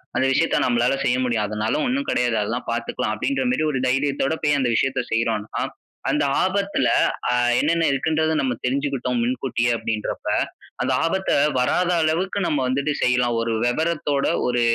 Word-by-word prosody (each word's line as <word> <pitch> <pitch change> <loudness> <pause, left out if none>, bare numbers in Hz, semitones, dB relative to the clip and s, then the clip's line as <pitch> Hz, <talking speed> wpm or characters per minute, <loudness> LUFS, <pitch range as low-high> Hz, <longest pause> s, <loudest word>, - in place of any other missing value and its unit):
"அந்த 130 - +2
விஷயத்த - - +2
நம்மளால 120 +1 +2
செய்ய 125 -1 +2
முடியும். 115 -4 0
அதனால 105 - -2
ஒண்ணும் 275 +3 -1
கிடையாது 120 -2 +1
அதெல்லாம் 115 +4 -3
பாத்துக்கலாம்" 115 -2 -2
அப்படின்ற 275 - -1
மாதிரி 200 - 0
ஒரு 130 - -1
தைரியத்தோட 135 +2 0
போய் 145 -1 +2
அந்த 125 - +1
விஷயத்த 135 +1 +1
செய்யறோம்னா, 115 -2 -1 0.5
அந்த - - +1 0.2
ஆபத்துல 195 -8 0 0.4
அ - - +1 0.3
என்னென்ன 165 +2 +1
இருக்குன்றத 160 +3 0
நம்ம 130 -2 -1
தெரிஞ்சுகிட்டோம் 130 -2 -1
முன்கூட்டியே 125 -1 -1
அப்படின்றப்ப, 110 -2 -4 0.6
அந்த - - 0
ஆபத்த 190 +3 -1 0.3
வராத 175 +8 +1
அளவுக்கு 175 +6 0
நம்ம 145 - 0
வந்துட்டு 140 +3 0
செய்யலாம். 125 -2 +2
ஒரு 115 0 -1
விவரத்தோட, 145 +1 0 0.2
ஒரு 120 -1 +1
130 Hz, 150 wpm, -22 LUFS, 120-155 Hz, 0.6 s, அந்த